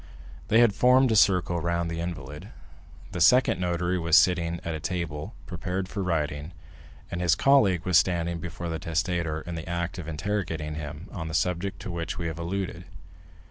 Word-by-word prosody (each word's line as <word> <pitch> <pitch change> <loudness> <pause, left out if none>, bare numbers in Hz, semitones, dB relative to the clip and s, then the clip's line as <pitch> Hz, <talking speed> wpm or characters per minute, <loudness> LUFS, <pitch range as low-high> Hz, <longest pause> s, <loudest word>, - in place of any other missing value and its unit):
They 115 +2 +5
had 115 -4 +5
formed 125 +2 +4
a - - +3
circle 90 -4 +3
round 85 0 -1
the 85 - -4
invalid; 75 -4 -6 0.6
the 90 - -4
second 95 0 +5
notary 90 0 0
was 85 0 +4
sitting 85 -2 +3
at 85 - -2
a 80 - -4
table, 85 +2 -4
prepared 90 +2 -3
for 100 - -4
writing, 75 -3 -2 0.6
and 85 - -3
his 85 -2 +3
colleague 100 - +4
was 90 -3 +6
standing 85 -1 -1
before 85 +1 -6
the 80 -1 -3
testator 80 -1 -1
in 85 - -7
the 80 0 -6
act 85 +1 -3
of 85 - -7
interrogating 80 -2 -3
him 75 +3 -7
on 80 -4 -5
the 80 - -4
subject 90 +3 -1
to - - -5
which 85 -1 -4
we 85 - -4
have 80 -1 -4
alluded. 90 0 -4
85 Hz, 180 wpm, -27 LUFS, 80-90 Hz, 0.6 s, was